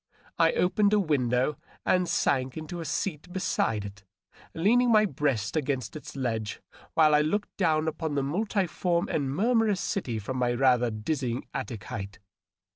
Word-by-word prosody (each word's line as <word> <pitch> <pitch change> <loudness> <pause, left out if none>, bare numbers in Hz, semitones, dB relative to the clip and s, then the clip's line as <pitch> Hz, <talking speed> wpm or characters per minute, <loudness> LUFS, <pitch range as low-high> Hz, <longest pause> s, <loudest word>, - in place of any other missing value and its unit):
I - - +5
opened 205 - +2
a 210 - +5
window 130 -5 +1 0.3
and 180 -1 +2
sank 130 0 +1
into 160 +3 -6
a 165 - -5
seat 165 +2 -3
beside 110 - 0
it, 100 0 -10 0.5
leaning 235 +8 +3
my 215 -1 +6
breast 140 - -1
against 135 -5 -2
its 150 -1 -9
ledge 115 -6 -2 0.4
while 155 -2 +5
I 150 - +5
looked 205 +8 -1
down 160 -4 +1
upon 160 -1 -2
the 140 - +1
multiform 180 +1 0
and 140 -3 -1
murmurous 215 - +2
city 130 - -2
from 120 +5 -4
my 120 -1 +1
rather 125 -1 +3
dizzy 120 +3 -3
attic 115 -6 -5
height. 100 -2 -6
150 Hz, 155 wpm, -28 LUFS, 125-180 Hz, 0.5 s, my